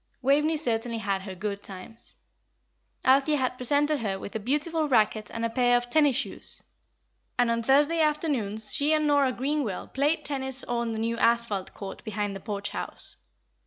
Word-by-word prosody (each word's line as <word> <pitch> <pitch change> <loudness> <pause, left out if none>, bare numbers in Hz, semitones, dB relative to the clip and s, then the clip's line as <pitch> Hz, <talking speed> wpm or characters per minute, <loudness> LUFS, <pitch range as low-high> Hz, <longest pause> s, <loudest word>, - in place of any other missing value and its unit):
Waveney 300 +4 +3
certainly 235 -5 -1
had 200 -3 -2
her 190 -1 -8
good 200 +1 -4
times. 195 +4 -6 0.9
Althea 275 +3 +4
had 255 -2 -1
presented 290 +4 +3
her 200 -4 -2
with 200 - -9
a - - -1
beautiful 300 +7 -1
racket 215 -3 +2
and 230 0 -3
a - - 0
pair 245 0 +3
of 245 0 -5
tennis 295 -3 +4
shoes, - - -4 0.7
and 245 -1 +2
on 230 0 0
Thursday 290 +7 +3
afternoons 280 -9 +4
she 295 +2 +3
and 305 0 +2
Nora 285 -3 +3
Greenwell 265 -5 -2
played 290 +4 0
tennis 265 -2 -2
on 235 -1 -2
the - - -4
new 230 +1 -2
asphalt 230 -5 +1
court 195 -1 -8
behind 205 -2 -3
the - - -6
Porch 205 0 -5
House. - - -5
245 Hz, 170 wpm, -27 LUFS, 215-290 Hz, 0.9 s, Althea